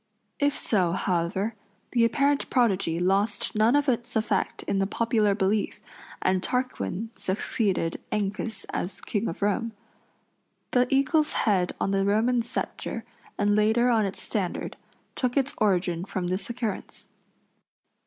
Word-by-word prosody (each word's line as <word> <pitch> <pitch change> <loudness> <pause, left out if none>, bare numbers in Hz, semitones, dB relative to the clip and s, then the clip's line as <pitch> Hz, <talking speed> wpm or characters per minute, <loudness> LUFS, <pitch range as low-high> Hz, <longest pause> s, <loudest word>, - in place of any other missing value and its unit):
If 285 0 +2
so, 180 -6 +1
however, 190 +4 0 0.4
the 235 -2 +3
apparent 280 +4 +2
prodigy 195 -9 +2
lost 195 +4 +1
none 220 +4 +4
of 290 0 +2
its 240 -1 -1
effect 215 -3 0
in 195 - 0
the 195 - +1
popular 220 -2 +2
belief, 205 +1 0 0.4
and 185 0 +2
Tarquin 230 -3 -2
succeeded 190 -3 -1
Ancus 210 +2 -2
as 185 +2 -3
King 210 +1 -2
of 170 - -4
Rome. 225 +3 0 1.0
The 250 0 +3
eagle's 290 +3 +3
head 185 -4 +2
on 195 - 0
the 195 0 +2
Roman 225 +5 +2
sceptre, 235 +2 -4 0.3
and 205 0 +2
later 220 +4 +3
on 220 -3 +3
its 195 - -5
standard, 195 -6 -2 0.4
took 250 +1 -1
its 275 0 +1
origin 180 -4 +1
from 190 -2 -3
this 185 +5 -2
occurrence. 235 -4 -4
215 Hz, 135 wpm, -27 LUFS, 195-240 Hz, 1.0 s, none